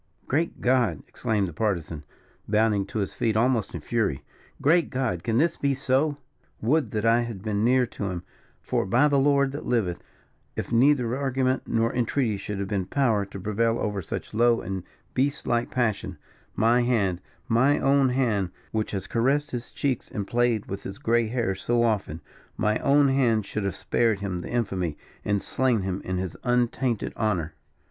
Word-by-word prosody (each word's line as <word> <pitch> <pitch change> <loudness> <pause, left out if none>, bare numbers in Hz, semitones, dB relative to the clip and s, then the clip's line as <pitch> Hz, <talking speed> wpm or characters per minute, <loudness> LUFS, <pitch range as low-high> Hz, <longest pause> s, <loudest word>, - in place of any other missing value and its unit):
"Great 160 +5 -1
God!" 120 - +2
exclaimed 105 -3 -1
the 85 - -7
Partisan, 85 -6 -2 0.5
bounding 105 -2 +2
to 130 - -6
his 100 -3 -2
feet 110 -2 0
almost 115 -2 +1
in - - -5
fury; 110 - -1 0.4
"great 165 +4 +3
God! 125 - -2
can 115 -1 0
this 165 +5 +2
be 140 -1 +1
so? 140 +3 +1 0.4
Would 145 +7 +1
that 110 0 -2
I 115 +1 +4
had 115 -5 -5
been 105 -1 -1
near 125 +2 +4
to 110 -3 -6
him; 90 -1 -5 0.4
for, - - -1
by 125 +9 +4
the 140 -2 +3
Lord 140 -1 +3
that 145 - -6
liveth, 100 -8 0 0.5
if - - -4
neither 125 0 +3
argument 130 -1 0
nor 115 +1 +1
entreaty 120 -2 0
should 100 +1 -5
have 100 0 -3
been 95 -2 -2
power 115 -8 +1
to 100 - -8
prevail 115 +4 0
over 105 -3 -2
such 80 - -6
low 115 +1 +4
and 95 0 -4 0.3
beast 140 +2 0
like 120 0 0
passion, 110 -5 -1 0.4
my 115 +3 +4
hand 100 -8 +1 0.3
my 130 +6 +3
own 135 -1 +3
hand, 115 -8 +1 0.2
which 110 -1 -1
has 95 -2 -4
caressed 140 +6 +1
his 120 -1 -5
cheeks 135 -4 -2
and 100 - -4
played 120 -1 +1
with 100 - -5
his 95 +1 -7
grey 115 0 +1
hairs 110 -5 -1
so 120 0 +2
often 100 -9 -1 0.4
my 105 0 +1
own 140 0 +4
hand 120 -6 +2
should 110 -2 -3
have 100 - -2
spared 115 -3 +1
him 95 -3 -3
the - - -7
infamy, 95 -9 -1 0.3
and 100 -1 0
slain 125 -4 +1
him 95 0 -3
in 95 0 -2
his 90 -2 -3
untainted 120 -1 0
honour." 90 -8 -1
115 Hz, 180 wpm, -26 LUFS, 100-130 Hz, 0.5 s, I